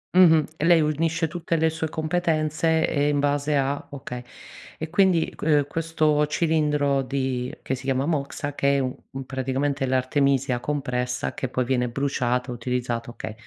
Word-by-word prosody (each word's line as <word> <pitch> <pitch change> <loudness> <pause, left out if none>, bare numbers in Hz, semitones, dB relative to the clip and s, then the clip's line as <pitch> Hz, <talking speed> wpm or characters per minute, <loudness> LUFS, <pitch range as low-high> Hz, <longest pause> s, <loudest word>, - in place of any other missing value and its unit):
Mh-mh, 165 -4 +7 0.2
lei 170 -1 +6
unisce 160 +2 0
tutte 170 +1 -2
le 160 0 +2
sue 160 0 -3
competenze, 160 0 +1
ehm, 145 -1 +1
in - - +1
base 145 +1 +1
a 140 +1 0
okay. 125 -3 -7 0.6
E 160 - -4
quindi, 180 -2 +3
uhm, 150 -2 +3
questo 155 -1 +1
cilindro 150 -3 +1
di 130 -2 -2
che - - -2
si 130 0 -6
chiama 135 0 +1
moxa, 145 -2 -2
che 140 0 +2
è - - +2
un 135 0 -5
praticamente 135 +1 -1
l'artemisia 130 0 +1
compressa 125 -3 -2
che 130 - -3
poi 125 0 -1
viene 125 -1 0
bruciata, 125 -1 -1
utilizzata, 120 -1 -3
okay. 115 -2 -7
140 Hz, 150 wpm, -24 LUFS, 130-155 Hz, 0.6 s, Mh-mh